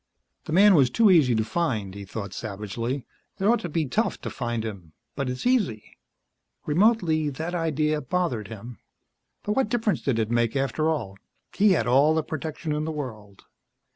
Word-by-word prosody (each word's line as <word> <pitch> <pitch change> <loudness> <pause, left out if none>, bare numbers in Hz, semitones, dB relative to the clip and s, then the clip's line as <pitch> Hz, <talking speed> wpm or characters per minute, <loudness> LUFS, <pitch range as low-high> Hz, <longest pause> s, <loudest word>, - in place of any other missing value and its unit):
The - - -6
man 200 +4 +6
was 135 -7 +5
too 220 - +4
easy 140 -9 +5
to 110 - +1
find, 110 - -2
he 100 0 -8
thought 100 +1 -6
savagely. 110 +5 -4 0.3
It 195 - -2
ought 235 +3 +4
to 175 - -5
be 160 0 0
tough 210 - -1
to - - -5
find 120 -3 -3
him 95 -7 -8 0.2
but 140 -2 -2
it's 125 - -5
easy. 210 - 0 0.7
Remotely, 165 -3 +2
that 160 +5 -5
idea 155 -2 0
bothered 130 - -1
him. 115 +2 -9 0.6
But 210 - -2
what 265 -5 +1
difference 225 -3 0
did 130 -5 0
it 110 0 -1
make, 120 +1 +1
after 140 +3 0
all? 110 -12 -3 0.4
He 200 -1 +5
had 115 -10 +1
all 140 +6 +4
the 160 - +1
protection 155 +1 -5
in 150 0 -1
the 160 - -2
world. 110 -10 -7
145 Hz, 180 wpm, -25 LUFS, 115-170 Hz, 0.7 s, man